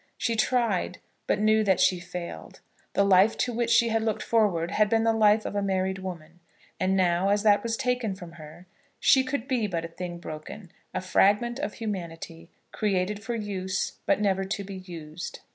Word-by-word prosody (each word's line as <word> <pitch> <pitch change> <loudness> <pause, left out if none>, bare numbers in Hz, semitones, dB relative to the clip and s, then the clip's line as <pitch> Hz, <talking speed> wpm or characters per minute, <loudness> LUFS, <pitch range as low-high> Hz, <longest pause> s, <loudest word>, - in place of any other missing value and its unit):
She 230 - 0
tried, 220 -5 0 0.3
but - - +2
knew 215 +1 +3
that 190 -3 +2
she 185 - +3
failed. 175 0 -8 0.3
The 200 - +3
life 195 +2 +5
to 245 - -1
which 235 0 -1
she 235 0 +4
had 225 0 +1
looked 220 -1 -1
forward 195 -7 +1
had 210 -1 +2
been 225 0 +2
the 225 0 +3
life 215 -1 +4
of - - -4
a 205 - +1
married 190 -1 -1
woman; 175 -3 -8 0.4
and 190 +1 +1
now, 180 +1 +2
as 205 +1 +2
that 205 -1 +5
was 230 -1 -2
taken 250 -6 -1
from 175 -3 -10
her, 160 +1 -12 0.3
she 265 - +5
could 260 -1 -3
be 245 -6 0
but 170 -4 -3
a - - -7
thing 175 0 -6
broken, 170 +3 -9 0.2
a 185 - -3
fragment 205 +6 +2
of 285 -7 -3
humanity, 170 -5 -6 0.2
created 205 0 -1
for 235 +2 -3
use, 195 -3 -3
but - - +3
never 195 -2 +1
to 200 +1 -3
be 195 0 -7
used. 170 -3 -8
200 Hz, 195 wpm, -27 LUFS, 180-220 Hz, 0.4 s, life